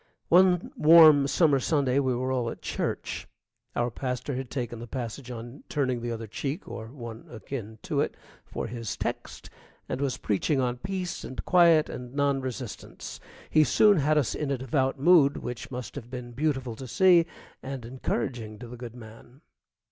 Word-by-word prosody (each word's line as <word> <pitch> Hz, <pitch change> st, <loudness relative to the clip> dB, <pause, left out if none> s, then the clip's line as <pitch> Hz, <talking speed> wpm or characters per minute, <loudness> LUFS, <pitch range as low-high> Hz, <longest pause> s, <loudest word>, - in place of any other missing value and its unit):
One 180 Hz, +6 st, +5 dB
warm 155 Hz, -, +8 dB
summer 140 Hz, -1 st, +3 dB
Sunday 140 Hz, -1 st, +1 dB
we 130 Hz, -3 st, +1 dB
were 130 Hz, +2 st, -1 dB
all 125 Hz, -3 st, 0 dB
at -, -, -9 dB
church. -, -, -3 dB, 0.5 s
Our 120 Hz, 0 st, 0 dB
pastor 125 Hz, +3 st, -3 dB
had 130 Hz, -1 st, -4 dB
taken 120 Hz, -4 st, -4 dB
the 120 Hz, -, -8 dB
passage 125 Hz, +1 st, -5 dB
on 120 Hz, +3 st, -8 dB
turning 130 Hz, -5 st, 0 dB
the 120 Hz, 0 st, -3 dB
other 115 Hz, -1 st, -4 dB
cheek, 140 Hz, -, -4 dB
or 110 Hz, -1 st, -7 dB
one 115 Hz, -2 st, -9 dB
akin 110 Hz, -1 st, -7 dB
to -, -, 0 dB
it, -, -, -2 dB, 0.3 s
for -, -, -5 dB
his 115 Hz, -2 st, -5 dB
text, -, -, -5 dB, 0.4 s
and 130 Hz, -, -3 dB
was 140 Hz, -3 st, 0 dB
preaching 110 Hz, +8 st, 0 dB
on 125 Hz, -1 st, 0 dB
peace 185 Hz, +3 st, -4 dB
and 130 Hz, -, -6 dB
quiet 170 Hz, -4 st, +5 dB
and 125 Hz, +1 st, -8 dB
non 140 Hz, -1 st, +2 dB
resistance. 125 Hz, -3 st, -7 dB, 0.3 s
He 155 Hz, -, +6 dB
soon 205 Hz, +5 st, +5 dB
had 155 Hz, +1 st, +2 dB
us 135 Hz, -8 st, +1 dB
in 150 Hz, -, -3 dB
a 140 Hz, -, 0 dB
devout 130 Hz, +2 st, 0 dB
mood 150 Hz, -2 st, +5 dB
which 125 Hz, +2 st, -6 dB
must 125 Hz, -4 st, -6 dB
have 120 Hz, -4 st, -8 dB
been 125 Hz, -1 st, -7 dB
beautiful 130 Hz, -3 st, -1 dB
to 130 Hz, -, -7 dB
see 175 Hz, +3 st, +5 dB, 0.3 s
and 135 Hz, -3 st, -6 dB
encouraging 120 Hz, -3 st, -3 dB
to 120 Hz, +2 st, -9 dB
the 120 Hz, +1 st, -9 dB
good 120 Hz, -1 st, -8 dB
man. 120 Hz, +3 st, -13 dB
130 Hz, 180 wpm, -27 LUFS, 120-145 Hz, 0.5 s, warm